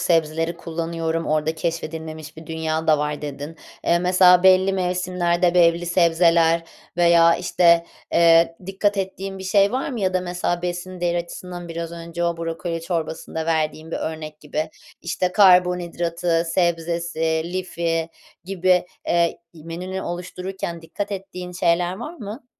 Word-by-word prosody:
sebzeleri 165 -1 +1
kullanıyorum, 165 0 -3
orada 155 +1 0
keşfedilmemiş 160 -1 -5
bir 160 0 -11
dünya 160 0 -2
da 155 -1 +4
var" 150 0 -2
dedin. 145 +2 -6 0.3
Eee, 170 - +3
mesela, 180 0 +5
belli 190 +1 +5
mevsimlerde, 180 -1 0
belli 170 0 +4
sebzeler 170 -1 +3 0.3
veya, 170 -1 +5
işte, 170 -1 +3 0.3
eee, 165 0 +5
dikkat 200 +2 0
ettiğin 195 0 -4
bir 190 - -8
şey 200 +2 +3
var 260 +1 -1
mı? 245 -4 -4
Ya 185 -1 0
da, 185 - +2
mesela, 175 -1 -2
besin 180 +1 -4
değeri 175 0 +1
açısından 175 0 -7
biraz 165 0 -5
önce 170 0 -5
o 170 0 0
brokoli 165 0 -4
çorbasında 160 -1 -4
verdiğin 160 0 -1
bir - - -2
örnek 155 -1 -5
gibi. 155 +1 -3 0.3
İşte, 180 +1 -1
karbonhidratı, 175 -3 +3
sebzesi, 165 -2 0
lifi 170 -2 -2 0.4
gibi, 180 -1 +2 0.2
eee, 170 -1 +1 0.2
menünü 175 +4 -6
oluştururken 180 0 -5
dikkat 205 +5 -5
ettiğin 185 -2 -7
şeyler 175 0 +1
var 300 - -7
mı? 225 -1 -8
170 Hz, 140 wpm, -22 LUFS, 165-180 Hz, 0.4 s, mesela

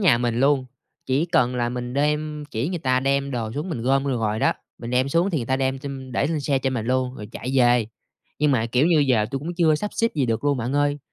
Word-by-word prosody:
nhà 150 - +4
mình 120 0 0
luôn, 135 -1 +3 0.4
chỉ 135 +5 +1
cần 155 -8 +2
là 120 -1 0
mình 125 0 -5
đem 150 +1 -1
chỉ 115 +8 -2
người 180 -2 -3
ta 130 -3 +1
đem 140 +1 0
đồ 115 -4 -3
xuống, 150 +8 -4
mình 120 -9 -4
gom 135 +2 +2
vô 140 - -1
rồi 110 -4 -1
đó, - - +3 0.3
mình 115 - -6
đem 130 +2 +2
xuống 170 +7 +2
thì 165 - 0
người 120 - -4
ta 130 - +1
đem 135 0 -1
chem 135 -2 -7
để 140 - +1
lên 155 -1 -1
xe 140 -1 +1
cho 130 0 -1
mình 115 -4 -3
luôn, 130 0 0
rồi 105 -2 -8
chạy 125 - -5
về. 120 -3 +4 0.5
Nhưng 150 0 +3
mà, 115 -3 +1
kiểu 125 +5 +2
như, 170 -2 +4
giờ 125 -7 +3
tui 135 - -2
cũng 165 +6 -5
chưa 160 -3 +4
sắp 210 +7 -3
xếp 230 - +2
gì 140 -5 +1
được 115 +2 -1
luôn 145 -2 +2
bạn 120 +2 -2
ơi, 145 0 +1
135 Hz, 275 wpm, -23 LUFS, 125-150 Hz, 0.5 s, nhà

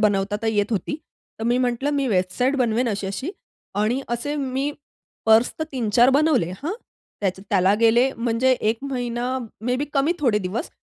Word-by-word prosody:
बनवता 205 -1 +2
तर - - -1
येत 205 -2 +2
होती. 215 - -1 0.4
तर 225 - -4
मी 240 +1 +2
म्हंटलं 250 +2 0
मी 275 -1 +1
वेबसाईट 210 +7 +1
बनवेन 240 -1 +1
अशी-अशी 200 - -3 0.4
आणि 215 +6 +1
असे 240 +5 -2
मी 270 0 -1 0.6
पर्स 220 +2 +5
तर 315 - -1
3-4 240 0 +3
बनवले 275 - +3
हां. 325 +5 -2 0.5
त्याच 190 -2 -1
त्याला 195 -1 +2
गेले 235 +3 +5
म्हणजे 235 +2 +1
1 220 +1 +1
महिना 245 0 -2 0.3
मे 250 +1 +1
बी 280 - -1
कमी 285 +3 +2
थोडे 240 -9 +2
दिवस 210 - -4
240 Hz, 165 wpm, -23 LUFS, 210-265 Hz, 0.6 s, पर्स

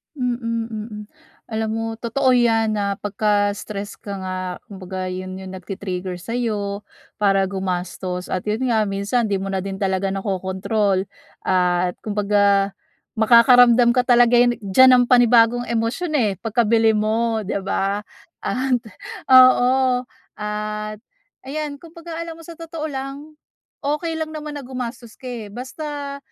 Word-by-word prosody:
Mm, 235 -3 -2
mm. 215 -1 -6 0.5
alam 220 0 -2
mo 225 0 -3
totoo 250 +4 0
yan 225 -2 +3
na 200 -1 0
pagka-stress 205 0 -1
ka 200 - -9
nga, 185 0 -4 0.3
kumbaga 185 -1 -5
'yon 185 0 -5
yung 190 -1 -8
nagti-trigger 185 -1 -5
sa'yo 210 -3 -3 0.3
para 195 -1 +3
gumastos. 180 -1 -4
At 185 +1 -3
'yon 225 +5 -1
nga, 220 -2 +2
minsan 200 +4 0
di 200 -3 -1
mo 195 - -4
na 195 - -1
din 195 +1 -5
talaga 190 0 0
nakokontrol 195 0 -1 0.3
at 180 -1 +1
kumbaga, 200 -1 +2 0.4
makakaramdam 240 +1 +6
ka 250 - +3
talaga 245 -1 +5
yan 240 0 +4
diyan 230 +7 +6
ng 245 - +2
panibagong 240 -1 +5
emosyon 235 +9 -1
eh, 215 -5 +2
pagkabili 225 -1 +3
mo, 220 +1 0
di 200 - -2
ba? 195 +1 -1 0.4
At 255 0 0 0.5
oo, 255 0 +6 0.4
at 210 0 -4 0.5
ayan 290 +1 -4
kumbaga 335 0 -9
alam 330 -1 -7
mo - - -12
sa 340 - -9
totoo 330 -1 -6
lang, 275 +3 -6 0.5
okey 300 +3 -1
lang 315 -1 -3
naman 300 -1 -6
na 275 - -8
gumastos 245 -2 -6
ka, - - -15
eh, 225 -4 -6
basta, 280 +3 -6
220 Hz, 135 wpm, -21 LUFS, 200-250 Hz, 0.5 s, makakaramdam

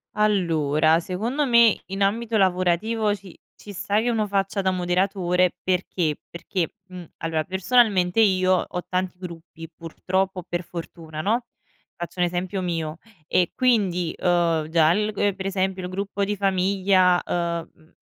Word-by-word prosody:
Allora, 165 -7 +2
secondo 225 - -2
me 235 -3 +5
in 195 +1 -6
ambito 225 +3 0
lavorativo 195 +3 +1
ci 195 -3 -14 0.2
ci 205 - -9
sta 205 +3 0
che 240 - 0
uno 225 -3 +1
faccia 195 0 -1
da 190 - +2
moderatore, 180 0 +1
perché? 180 -4 0 0.2
Perché, 170 0 -3
mhmm, 180 -2 -9
allora, 160 -1 -1
personalmente, 190 0 +2
io 185 -3 +4
ho 180 - -4
tanti 185 0 -2
gruppi, 165 -2 -9
purtroppo 185 +3 -2
o - - -7
per 175 +1 -2
fortuna, 165 -2 -7
no, 230 +7 0 0.5
faccio 175 +1 -7
un 175 - +4
esempio 180 +2 -2
mio 165 -3 -3 0.3
e 180 -1 +2
quindi, 195 -9 +1
ehm, 170 -3 +1
già 160 -1 +4
il 210 +2 0
gu 205 -1 0
per 190 -1 -6
esempio 190 -1 -1
il 180 - -4
gruppo 200 +1 -3
di 205 +1 -2
famiglia, 190 -1 +2
ehm, 170 -1 -2
mhmm, 160 +1 -25
185 Hz, 155 wpm, -24 LUFS, 175-200 Hz, 0.5 s, me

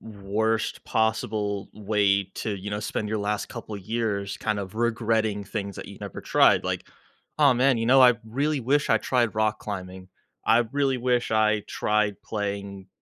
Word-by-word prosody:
worst 110 +1 -2
possible 110 -2 -1
way 100 -1 +1
to, 105 -2 -3
you 100 +2 -6
know, 105 - -2
spend 105 0 -3
your 110 0 -1
last 105 +1 -2
couple 115 -3 -7
years 100 -1 -2
kind 105 -2 -1
of 95 +1 -7
regretting 110 -3 0
things 100 0 -4
that - - -8
you - - -11
never - - -7
tried, - - +4
like, - - -3 0.5
"Aw, 140 -4 +6
man," 130 0 +3
you 115 - -1
know, 130 +1 +6
"I 125 -1 +7
really 140 +5 -1
wish 140 +3 +1
I 110 - +5
tried 120 -4 0
rock 110 0 +1
climbing. 95 -2 -7 0.4
I 115 +1 +5
really 135 -2 +1
wish 125 -1 0
I 110 -1 +3
tried 105 -2 0
playing, 100 -2 -4
110 Hz, 170 wpm, -25 LUFS, 100-115 Hz, 0.5 s, I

